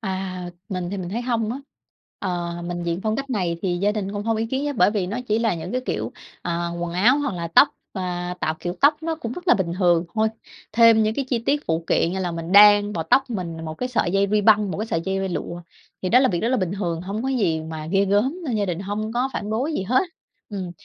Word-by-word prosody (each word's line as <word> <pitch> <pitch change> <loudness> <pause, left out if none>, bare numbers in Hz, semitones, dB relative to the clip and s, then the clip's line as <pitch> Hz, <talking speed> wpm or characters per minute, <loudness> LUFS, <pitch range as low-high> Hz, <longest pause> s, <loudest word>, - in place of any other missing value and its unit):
À, 190 -3 -4 0.3
mình 180 -2 -3
thì 200 - -3
mình 180 -2 -4
thấy 225 +6 -3
hông 230 -3 0
á. 260 - -5 0.6
Ờ, 175 -1 -3
mình 175 0 -4
diện 170 +1 -2
phong 220 0 0
cách 275 0 -4
này 180 -7 -1
thì 180 -2 0
gia 205 +2 +2
đình 200 -2 -3
cũng 205 - -3
hông 225 0 +1
ý 225 +1 -1
kiến 265 +4 -2
á. 290 - -1
Bởi 180 - +5
vì 205 -4 -1
nó 210 +6 -3
chỉ 215 - +2
là 230 -4 +1
những 165 - -6
cái 255 - 0
kiểu - - -2 0.7
quần 175 -1 -3
áo 225 +10 +4
hoặc 285 -7 -1
là 170 -1 -4
tóc 220 - +6 0.3
và 180 -1 -3
tạo 155 - 0
kiểu 175 0 -3
tóc 295 +2 +4
nó 325 0 -1
cũng 240 -7 -5
rất 360 +6 -7
là - - +7
bình 170 -4 -1
thường 175 -2 +3
thôi, 220 0 +2 0.4
thêm 230 0 +6
những 215 0 +1
cái 275 - -1
chi 245 - +1
tiết 290 +1 +1
phụ 165 0 -1
kiện 170 - +2
như 190 - -2
là 180 -2 -2
mình 165 +1 -5
đan 205 0 +7
vào 165 - -2
tóc 265 -1 +3
mình 180 -7 -4
là 165 - -7
một 155 -1 -5
cái 250 +9 -3
sợi 235 -8 0
dây 195 0 +3
ruy 210 0 +3
băng, 210 -1 +4
một - - -4
cái 215 - -2
sợi 165 - -1
dây 195 0 -1
lụa 175 -1 -4 0.4
thì 185 - 0
đó 245 +6 +6
là 260 - +4
việc 175 -5 -1
rất 230 - 0
là 260 - +2
bình 185 -5 -1
thường, 175 -5 -2
hông 200 +5 -4
có 265 - -1
gì 195 -12 +1
mà 155 -1 -6
ghê 195 +3 +2
gớm 210 - +1
nên 250 -7 -1
gia 205 - +1
đình 175 -1 -2
hông 205 +3 -3
có 245 +3 0
phản 205 -2 -4
đối 255 +9 -1
gì 195 - -1
hết. 250 +7 +2 0.5
Ừm, 190 -4 -5
200 Hz, 275 wpm, -23 LUFS, 175-230 Hz, 0.7 s, là